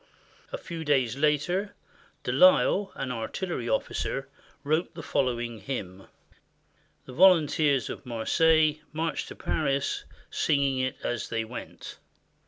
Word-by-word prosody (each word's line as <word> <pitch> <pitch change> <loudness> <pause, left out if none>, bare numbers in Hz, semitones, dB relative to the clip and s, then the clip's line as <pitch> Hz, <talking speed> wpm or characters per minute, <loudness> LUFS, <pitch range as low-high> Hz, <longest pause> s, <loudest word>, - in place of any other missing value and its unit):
A - - -3
few 170 - -7
days 135 -5 +2
later, 155 +8 0 0.5
De - - -1
Lisle, 275 -8 +5
an 130 -2 -3
artillery 125 +2 -3
officer, - - -2 0.4
wrote 155 +4 0
the - - -7
following 120 -3 -1
hymn. 95 -7 -6 1.0
The 130 - -10
volunteers 155 - +4
of - - -7
Marseilles 155 +6 +2
marched 160 +1 -2
to - - -9
Paris 140 -3 -1 0.3
singing 140 -3 +1
it 130 0 -1
as 120 -3 -2
they 115 -1 -1
went. 120 +2 -9
140 Hz, 120 wpm, -27 LUFS, 125-160 Hz, 1.0 s, Lisle